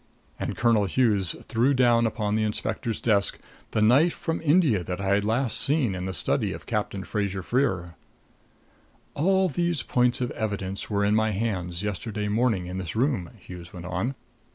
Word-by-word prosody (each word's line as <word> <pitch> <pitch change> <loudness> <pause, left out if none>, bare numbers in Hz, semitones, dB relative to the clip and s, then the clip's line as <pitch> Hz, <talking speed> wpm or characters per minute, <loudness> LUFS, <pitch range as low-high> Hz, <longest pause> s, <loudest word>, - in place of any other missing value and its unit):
And - - -3
Colonel 115 -4 +3
Hughes 100 -4 +1
threw 125 +5 +2
down 120 -2 +4
upon 105 -2 -2
the 110 - +1
inspector's 110 +2 -2
desk 100 -4 +2 0.3
the 105 - +1
knife 140 +10 +4
from 165 0 -3
India 145 - +3
that 90 +1 -4
I 100 0 +1
had 100 0 +2
last 115 +2 0
seen 140 -8 +1
in 90 0 -4
the - - -2
study - - 0
of - - -9
Captain 95 -1 -2
Fraser 100 -3 -2
Freer. 95 -9 0 1.2
"All 190 +4 +2
these 170 0 0
points 125 0 +2
of 125 -1 -2
evidence 100 -3 -4
were 100 -1 +1
in 105 - +2
my 110 0 +3
hands 95 -4 -2
yesterday 105 +1 -3
morning 110 -4 +1
in 90 +1 -5
this 90 -1 -5
room," 120 - 0
Hughes 90 -2 -11
went 90 -1 -8
on. 90 +9 -2
110 Hz, 175 wpm, -26 LUFS, 95-125 Hz, 1.2 s, down